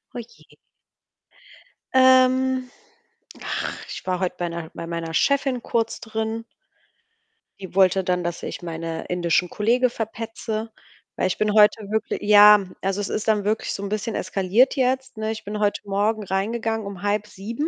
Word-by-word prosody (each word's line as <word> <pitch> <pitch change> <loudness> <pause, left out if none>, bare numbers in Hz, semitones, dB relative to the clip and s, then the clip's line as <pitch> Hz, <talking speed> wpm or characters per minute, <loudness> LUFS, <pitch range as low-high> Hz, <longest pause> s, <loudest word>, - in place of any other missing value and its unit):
Oh - - -3
je. 235 0 -14 1.4
Ähm, 260 0 +4 0.7
ach, - - -3
ich - - -8
war 185 -1 0
heut 185 -2 -2
bei 175 - -2
'ner 170 -1 -6
bei - - -6
meiner 165 -1 -4
Chefin 270 +3 +1
kurz 230 -1 -1
drin. 220 0 -4 1.2
Die 190 -2 -10
wollte 190 0 +4
dann, 180 -1 0
dass 175 0 -4
ich - - -5
meine 165 -1 -5
indischen 175 0 0
Kollege 240 +6 +2
verpetze. 225 -1 -5 0.5
Weil - - +1
ich 185 - -2
bin 215 -1 +1
heute 210 +1 +5
wirkli 220 -1 -2
ja, 210 0 +8 0.2
also, 195 +1 -1
es 200 - -4
ist 215 - -3
dann 215 -2 +2
wirklich 215 +2 -1
so 200 - -5
'n 200 - -4
bisschen 215 +2 -3
eskaliert 195 +7 +2
jetzt, 260 -1 0
ne? 220 0 -2
Ich 220 -1 -6
bin 210 +1 -5
heute 205 -1 0
Morgen 210 +2 0
reingegangen 220 +3 -2
um 195 -3 -8
06:30 210 +6 -2
210 Hz, 160 wpm, -23 LUFS, 190-230 Hz, 1.4 s, ja